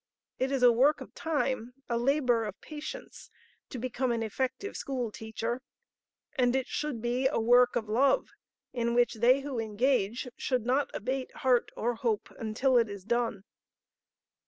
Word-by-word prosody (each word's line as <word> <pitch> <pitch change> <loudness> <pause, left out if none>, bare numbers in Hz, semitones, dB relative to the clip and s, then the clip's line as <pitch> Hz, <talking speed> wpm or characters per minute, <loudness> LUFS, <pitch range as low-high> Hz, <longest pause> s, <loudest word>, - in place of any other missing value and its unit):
It 260 +1 0
is 270 -2 0
a 245 - +8
work 270 +6 +4
of - - -10
time, 260 -6 -2
a 235 - -1
labor 245 -1 +2
of 205 -2 -6
patience, 305 0 -8 0.4
to 260 - -6
become 250 +1 -1
an 230 -1 0
effective 260 - -3
school 250 -5 -3
teacher; 225 +3 -4 0.7
and 250 -3 +2
it 265 -1 +1
should 280 -7 -3
be 245 +2 +1
a 270 - 0
work 245 +2 +5
of 225 -3 -1
love 260 +6 +2 0.4
in 235 -1 0
which 245 0 +3
they 245 +5 +4
who 275 -3 -4
engage 225 +1 0
should 250 -4 -1
not 265 +3 +1
abate 260 +4 -3
heart 250 -2 +4
or 240 +2 0
hope 225 -2 -2
until 240 +3 +2
it 230 -2 +1
is 200 -2 -7
done. 230 -3 0
245 Hz, 160 wpm, -30 LUFS, 230-265 Hz, 0.7 s, a